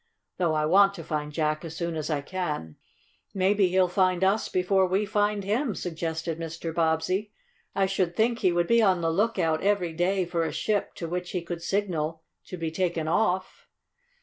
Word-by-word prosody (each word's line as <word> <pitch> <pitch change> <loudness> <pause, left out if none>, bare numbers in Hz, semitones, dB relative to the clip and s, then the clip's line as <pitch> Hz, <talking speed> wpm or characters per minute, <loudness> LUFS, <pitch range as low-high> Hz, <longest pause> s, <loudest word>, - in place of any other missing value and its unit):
Though 170 -4 +1
I 155 0 +1
want 195 +4 +5
to 165 - -7
find 150 -1 -3
Jack 155 0 -1
as 160 -1 -7
soon 170 -1 -2
as 155 0 -3
I 150 -3 0
can." 150 - -4 0.6
"Maybe 195 +1 +3
he'll 185 0 +3
find 185 0 +1
us 195 +3 +2
before 185 +1 +2
we 195 +3 +1
find 205 -1 0
him," 215 +3 0
suggested 165 -1 -3
Mr. 165 0 -5
Bobbsey. 165 +5 0 0.4
"I 195 - +3
should 185 -3 -1
think 230 +3 +2
he 185 -4 +3
would 175 0 +1
be 235 +4 +4
on 190 -5 +3
the 165 0 +1
lookout, 175 -4 +1
every 195 -4 +1
day, 180 +3 +1
for 170 -1 -1
a 160 - -2
ship 210 -2 -1
to 170 - -5
which 180 +1 -3
he 180 -2 -2
could 170 0 -5
signal 165 -4 -2 0.2
to 185 - -7
be 165 -1 -3
taken 170 -2 -1
off." 190 - 0
180 Hz, 190 wpm, -27 LUFS, 165-195 Hz, 0.6 s, want